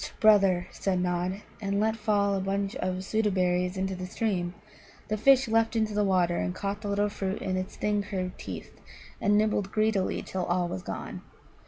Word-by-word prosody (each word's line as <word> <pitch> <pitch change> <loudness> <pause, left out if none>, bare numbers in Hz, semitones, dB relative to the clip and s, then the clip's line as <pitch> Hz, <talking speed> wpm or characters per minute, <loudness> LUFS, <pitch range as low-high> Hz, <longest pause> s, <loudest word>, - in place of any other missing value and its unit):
"Hsst, - - -8
brother," 195 -4 +5
said 190 -2 -1
Nod, 180 +2 -1 0.2
and 200 0 0
let 220 +1 +2
fall 205 -2 +1
a 195 - 0
bunch 195 +3 -1
of 185 0 -2
Soota 215 +2 +1
berries 180 0 +1
into 190 0 -1
the 180 0 -5
stream. 185 -3 -1 0.5
The 215 - +1
fish 265 +4 +5
leapt 225 +1 +2
in 220 -1 +3
the 210 -1 0
water, 180 -3 +2
and 90 0 -1
caught 200 +1 -3
the 210 - -5
little 205 +1 +2
fruit 195 -1 -3
in 185 -1 -2
its 185 0 -3
thin, 210 -1 0
curved 185 -2 -4
teeth, - - -7 0.5
and 205 0 +4
nibbled 210 -2 +1
greedily 215 -3 +1
till 185 -1 -3
all 175 0 +1
was 95 - -4
gone. - - -6
195 Hz, 195 wpm, -28 LUFS, 185-210 Hz, 0.5 s, brother